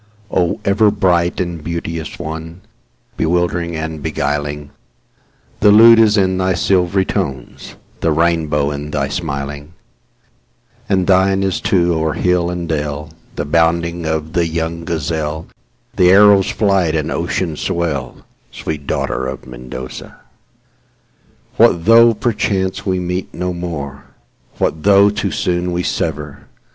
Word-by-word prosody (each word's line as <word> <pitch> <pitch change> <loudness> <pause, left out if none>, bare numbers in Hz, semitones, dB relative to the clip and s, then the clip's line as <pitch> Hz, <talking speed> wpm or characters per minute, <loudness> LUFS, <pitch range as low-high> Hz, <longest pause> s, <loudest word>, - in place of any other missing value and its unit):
O 90 -2 0
ever 105 +2 +4
bright 90 -3 +1
and 85 -3 -3
beauteous 85 -1 -5
one, 80 +3 -7 0.6
Bewildering 85 0 0
and 80 -1 -5
beguiling, 75 -1 -3 0.9
The 105 - +5
lute 115 +2 +8
is 110 -1 +4
in 95 -1 +1
thy 95 0 +1
silvery 95 +1 +1
tones, 65 -7 -5 0.2
The 80 - +1
rainbow 80 -3 +1
in 75 +1 -5
thy 70 -2 -2
smiling; 70 0 -5 1.2
And 95 -2 +2
thine 95 +1 +3
is, 95 -1 -1
too, 90 -2 +2
o'er 80 -1 0
hill 90 -1 +1
and 90 -1 -4
dell, 75 -1 -3 0.2
The 75 - -3
bounding 85 +2 +1
of 80 0 -3
the 85 -1 +1
young 80 +1 -3
gazelle, 80 -1 -3 0.5
The 90 - +4
arrow's 100 0 +6
flight 95 -6 +1
and 75 0 -1
ocean's 85 -1 -2
swell—Sweet 75 -1 -5
daughter 65 - -2
of 65 -1 -7
Mendoza! 65 0 -9 1.4
What 85 -1 +4
though, 115 +1 +6
perchance, 100 -4 -1
we 90 0 -2
no 90 0 -3
more 85 -6 -5 0.6
meet,—What 80 - -1
though 100 +1 +5
too 105 - -2
soon 90 0 -1
we 90 +1 -1
sever? 75 -4 -4
85 Hz, 125 wpm, -17 LUFS, 75-95 Hz, 1.4 s, lute